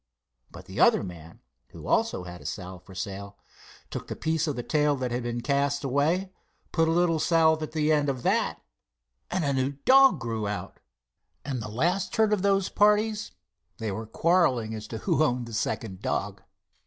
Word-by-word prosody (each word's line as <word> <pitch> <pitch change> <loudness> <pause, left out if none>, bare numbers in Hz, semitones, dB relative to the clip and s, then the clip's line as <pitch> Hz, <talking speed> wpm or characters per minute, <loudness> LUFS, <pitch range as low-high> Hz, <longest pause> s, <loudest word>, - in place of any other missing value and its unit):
But - - -12
the - - -7
other - - +5
man, 85 -3 -10 0.3
who - - -12
also 90 - +1
had 90 0 -8
salve 90 -2 -7
for 95 - -14
sale, 100 +1 -6 0.5
took - - -3
up - - -21
the - - -5
piece 160 0 -1
of 130 -5 -3
tail 150 -1 +2
that 130 -2 -3
had 120 +1 -1
been 120 0 -3
cast 140 +2 0
away, 155 +8 +1 0.4
put 165 -1 +2
a - - +2
little 165 -1 +2
salve 160 -1 +3
at 155 - -5
the 155 -1 +1
end 145 -2 +2
of 130 -3 -3
that, - - 0 0.7
and 180 -3 -1
a 140 - +1
new 135 +1 0
dog 270 0 +7
grew 115 -3 -3
out, 105 0 -5 0.7
and 130 -4 -3
the 105 - -6
last 175 - 0
heard 220 -2 +3
of 205 - +1
those 195 -1 +2
parties 210 - +2 0.5
they 110 -2 -3
were 110 +3 -5
quarrelling 130 - +2
as 110 -1 -6
to 115 - -5
who 135 - 0
owned 125 -4 0
the 115 - -10
second 105 -3 -3
dog. - - -2
140 Hz, 190 wpm, -27 LUFS, 110-165 Hz, 0.7 s, dog